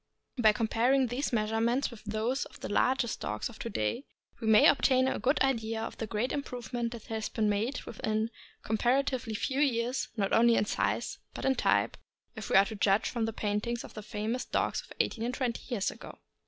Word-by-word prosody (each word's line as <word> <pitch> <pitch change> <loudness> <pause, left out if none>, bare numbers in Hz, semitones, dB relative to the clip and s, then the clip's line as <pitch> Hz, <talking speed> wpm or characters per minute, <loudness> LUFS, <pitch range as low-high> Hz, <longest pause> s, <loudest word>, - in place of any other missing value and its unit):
By 220 -2 +6
comparing 235 +5 +2
these 250 +5 -2
measurements 230 +4 +1
with 225 -3 -12
those 220 +5 -1
of - - -14
the - - -5
largest 255 -1 +1
dogs 105 0 -3
of 230 - -13
to 230 - -4
day, 200 - -2 0.3
we 225 - -4
may 220 -1 +7
obtain 260 -2 +4
a - - -1
good 270 +3 +2
idea 225 -4 0
of 225 - -5
the 225 - -3
great 220 +4 -1
improvement 245 -3 -3
that 235 -3 -8
has 220 -1 -3
been 220 -2 0
made, 210 +6 0
within 220 0 -2 0.3
a - - -19
comparatively 245 +1 +1
few 265 +5 -1
years, 255 -2 +1
not 195 -2 0
only 235 +1 +5
in 210 - +2
size, - - -1 0.2
but - - -4
in 265 - +4
type, - - +1 0.4
if 215 -2 -6
we - - +2
are 195 +1 +8
to 220 - -6
judge 200 0 +2
from 235 -3 -1
the 225 - -2
paintings 215 +3 -2
of - - -11
the 215 - -7
famous 215 +4 -3
dogs - - -1
of - - -19
eighteen 225 - 0
and 245 +2 -2
twenty 245 -4 -2
years 205 -6 0
ago. - - -11
230 Hz, 210 wpm, -30 LUFS, 215-250 Hz, 0.4 s, are